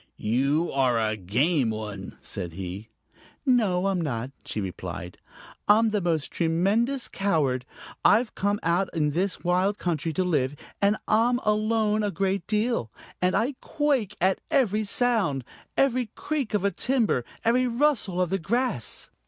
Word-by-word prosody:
"You 140 +9 +1
are 130 -4 +2
a 110 -1 0
game 120 - +1
one," 105 -3 -6
said 85 -2 -4
he. 95 +4 -6 0.6
"No, 210 -9 +3
I'm 195 -2 +1
not," 130 -4 -3
she - - -4
replied. 90 -2 -6 0.5
"I'm 220 +2 +5
the 210 -1 0
most 165 -4 -1
tremendous 200 +11 +1
coward. 140 -10 0 0.4
I've 225 +3 +4
come 205 +1 0
out 175 +3 +1
here - - -5
in 150 -1 +2
this 180 +5 -1
wild 185 +3 +2
country 165 -2 -1
to 185 - +1
live, 145 -6 0 0.3
and 205 +1 +3
I'm 235 +3 +3
alone 215 0 +2
a 205 - 0
great 195 0 -1
deal, 215 - 0 0.3
and 180 0 +2
I 250 +6 +1
quake 285 -9 0
at 190 +1 +2
every 215 -5 +2
sound, 205 - +1 0.3
every 255 -3 +2
creak 280 -8 -2
of 200 -1 0
a 200 - +3
timber, 230 - +1 0.2
every 250 +2 +3
rustle 240 -7 +1
of 180 -1 +1
the 195 - +1
grass. 215 - -1
190 Hz, 155 wpm, -26 LUFS, 140-220 Hz, 0.6 s, I'm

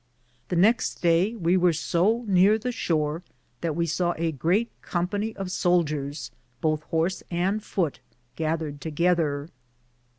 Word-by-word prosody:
The 180 - -1
next 220 +7 +2
day 175 +6 +3
we 175 -4 +2
weare 180 -1 +4
so 190 +9 +1
neare 195 +2 +5
the 250 +3 -3
shore 160 -8 -1 0.4
that 165 -3 -1
we 170 0 +1
saw 175 +1 0
a 165 0 0
greate 175 - +1
company 205 +5 -2
of 190 -2 -5
souldiers, 150 -8 0 0.3
bothe 155 +1 0
horse 165 +3 0
and 190 +5 0
foote, 170 -7 -1 0.4
gathered 155 -2 -2
together. 155 -2 0
170 Hz, 135 wpm, -26 LUFS, 155-190 Hz, 0.4 s, neare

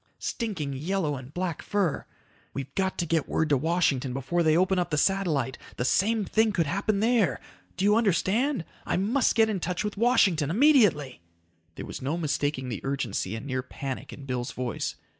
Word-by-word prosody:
Stinking 185 - -3
yellow 155 +2 -1
and 130 0 -9
black 175 -1 -3
fur. 195 -7 -1 0.5
We've 135 0 -5
got 190 -1 -1
to 175 - 0
get 165 -2 0
word 160 - 0
to 145 - +4
Washington 140 -4 +1
before 135 +6 0
they 160 -1 +4
open 185 +1 +2
up 175 - -1
the 150 - -1
satellite. 155 -8 +1 0.2
The 125 - -2
same 210 - +2
thing 220 +2 +2
could 170 -4 +1
happen 200 +6 0
there. 225 -4 +2 0.4
Do 190 - 0
you 210 +1 +5
understand? 215 - +1 0.2
I - - -1
must 225 +7 +2
get 225 -1 +5
in 210 -3 -1
touch 180 +4 -2
with 210 -1 -4
Washington. 195 - +3
Immediately!" 205 - +3 0.5
There - - -6
was - - -7
no 140 +6 -1
mistaking 145 -4 -1
the 115 - -4
urgency 125 -7 -2
and 110 - -7
near 130 -2 -2
panic 130 +1 -6
in 140 - -10
Bill's 125 -2 -3
voice. 125 -3 -3
170 Hz, 185 wpm, -27 LUFS, 140-200 Hz, 0.5 s, you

